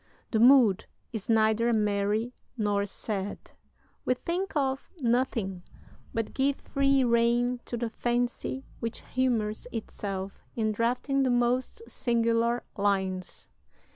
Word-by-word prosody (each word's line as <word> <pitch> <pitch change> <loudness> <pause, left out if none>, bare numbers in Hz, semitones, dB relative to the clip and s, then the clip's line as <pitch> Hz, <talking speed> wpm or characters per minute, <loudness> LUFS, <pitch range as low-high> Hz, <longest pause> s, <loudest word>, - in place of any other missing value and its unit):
The 220 - +2
mood 240 -5 +6 0.3
is 220 -2 -5
neither 220 +1 +3
merry 210 +2 +1 0.2
nor 205 -2 +1
sad. 200 -1 -5 0.5
We 255 - +2
think 350 +9 -3
of 270 -2 0
nothing, 230 -7 0 0.5
but 225 -1 -3
give 275 +1 +2
free 275 -1 +2
rein 240 +1 +2
to 240 - -4
the 235 -1 -2
fancy 245 +3 -1
which 230 -1 -4
humors 235 -4 0
itself 195 -3 -5
in 220 -2 +1
drafting 245 +5 0
the 265 - +2
most 245 - +1
singular 235 0 +1
lines. 190 -3 -1
235 Hz, 115 wpm, -28 LUFS, 210-250 Hz, 0.5 s, mood